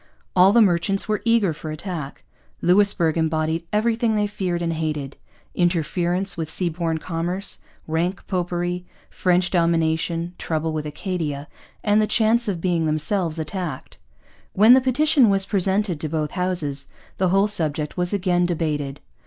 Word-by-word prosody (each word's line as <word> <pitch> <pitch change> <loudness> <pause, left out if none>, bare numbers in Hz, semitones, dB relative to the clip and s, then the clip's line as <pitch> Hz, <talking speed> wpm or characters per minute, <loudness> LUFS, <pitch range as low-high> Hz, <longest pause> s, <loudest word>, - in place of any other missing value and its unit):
All 185 +1 +6
the 230 +1 +6
merchants 195 +1 +1
were 215 -1 -1
eager 230 -7 +3
for 155 +1 -8
attack. 155 -2 -6 0.4
Louisbourg 180 -3 +3
embodied 160 +1 -1
everything 225 +1 +1
they 210 0 +1
feared 185 -4 -3
and 165 -1 -1
hated: 150 -4 -3 0.4
interference 175 +2 0
with 160 -2 -4
seaborne 165 -1 -1
commerce, 175 +4 -2 0.3
rank 170 +4 -2
popery, 175 -1 -2 0.3
French 180 -1 +1
domination, 165 0 0
trouble 160 0 -2
with 155 -1 -3
Acadia, 150 -3 -4 0.4
and 210 0 +3
the 215 - +1
chance 225 +2 +2
of 190 -4 -2
being 170 -2 0
themselves 160 +2 0
attacked. 160 -3 -5 0.5
When 215 +5 +7
the 260 - +6
petition 265 -1 +3
was 195 -1 +2
presented 195 -3 0
to 155 - -2
both 155 -1 -2
Houses, 175 -7 -1 0.3
the 185 -1 +1
whole 195 +2 +3
subject 155 -7 0
was 180 -1 -1
again 180 -3 +1
debated. 150 -5 -2
175 Hz, 145 wpm, -22 LUFS, 160-195 Hz, 0.5 s, When